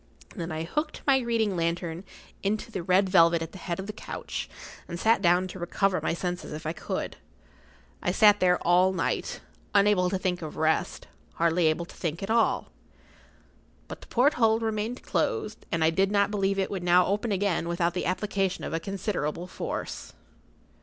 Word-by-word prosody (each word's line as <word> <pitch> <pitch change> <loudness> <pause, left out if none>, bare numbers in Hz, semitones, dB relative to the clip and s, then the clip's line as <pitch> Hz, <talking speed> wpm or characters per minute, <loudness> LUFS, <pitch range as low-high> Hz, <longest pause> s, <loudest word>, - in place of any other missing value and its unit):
Then 170 -4 -4
I 160 0 -3
hooked 300 - -3
my 275 -2 +5
reading 230 -5 0
lantern 170 0 -2 0.4
into 215 +3 -2
the 190 - -3
red 185 +3 +3
velvet 170 -3 +5
at 165 - -8
the 190 - -11
head 175 0 -4
of 190 - -4
the 210 - -6
couch, - - -6 0.4
and 170 -1 -6
sat 225 0 +3
down 180 0 +3
to 185 - -8
recover 185 +2 0
my - - 0
senses 175 -2 -4
if 155 +1 -7
I 155 - -1
could. - - -4 0.8
I 175 - 0
sat 205 +1 +6
there 180 -1 +4
all 180 +2 +4
night, - - -2 0.3
unable 200 -3 +4
to 190 - 0
think 185 -1 -1
of 155 -2 -7
rest—hardly 165 +1 0
able 155 +2 0
to - - -14
think 165 +1 -3
at 195 - -2
all. 230 0 +2 1.2
But - - -8
the - - -13
porthole 240 -4 +3
remained 225 +2 -3
closed, 440 - -2
and 165 -1 +1
I 160 - +4
did 195 +3 +2
not 200 0 +2
believe 195 -1 0
it 190 - -1
would 195 -3 -3
now 180 +1 +5
open 210 +3 -1
again 190 -4 0
without 170 0 0
the 180 - -2
application 195 0 -1
of - - -4
a 165 - 0
considerable 180 -4 -3
force. - - -5
185 Hz, 180 wpm, -27 LUFS, 170-205 Hz, 1.2 s, sat